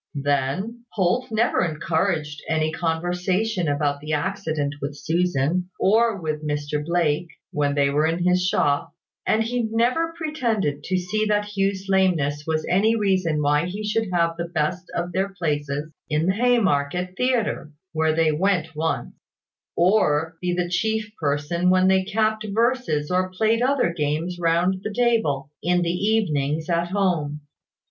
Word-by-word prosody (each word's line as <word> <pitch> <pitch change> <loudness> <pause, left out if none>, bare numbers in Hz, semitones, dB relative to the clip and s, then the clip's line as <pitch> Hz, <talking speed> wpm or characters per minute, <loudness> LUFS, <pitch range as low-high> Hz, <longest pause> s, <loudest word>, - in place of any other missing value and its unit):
Then, 145 - -1
Holt 205 +6 +1
never 225 -1 +2
encouraged 155 -2 -1
any 155 -1 +1
conversation 180 +4 -1
about 145 0 0
the 155 +1 -4
accident 155 -4 -1
with 145 +1 -4
Susan, 175 +1 0
or 220 +1 +3
with 155 -2 -3
Mr 150 0 -2
Blake, 170 0 0 0.2
when 145 -1 0
they 140 -1 +2
were 150 +2 +2
in 165 +2 -1
the 180 0 +4
shop; 160 -6 +1 0.3
and 220 +1 +3
he 245 +2 -1
never 250 +9 +1
pretended 230 - -1
to 185 - 0
see 215 +4 -1
that 210 0 0
Hugh's 195 -1 0
lameness 165 -7 +1
was 155 -1 0
any 215 +5 +3
reason 185 -8 +1
why 150 +3 +2
he 200 +4 -5
should 215 0 0
have 170 -1 +1
the 170 - -2
best 170 +2 -2
of 175 +1 -2
their 190 +2 0
places 150 -4 -3 0.2
in 155 +1 +1
the 190 - +2
Haymarket 185 -7 +1
Theatre 235 -10 0 0.2
(where 160 0 +1
they 160 -1 +3
went 165 -1 0
once), 160 +1 -2 0.6
or 165 -4 +2
be 180 0 0
the 175 0 0
chief 220 +4 -1
person 155 +4 0
when 185 0 +4
they 190 0 +4
capped 215 +1 0
verses 225 - 0
or 185 +1 +1
played 220 +5 +1
other 255 -8 +2
games 165 +3 -2
round 175 +3 +1
the 215 - -4
table, 205 - +1
in 180 +1 +2
the 170 0 0
evenings 160 -6 0
at 170 0 +1
home. 175 -6 0
175 Hz, 155 wpm, -23 LUFS, 150-200 Hz, 0.6 s, the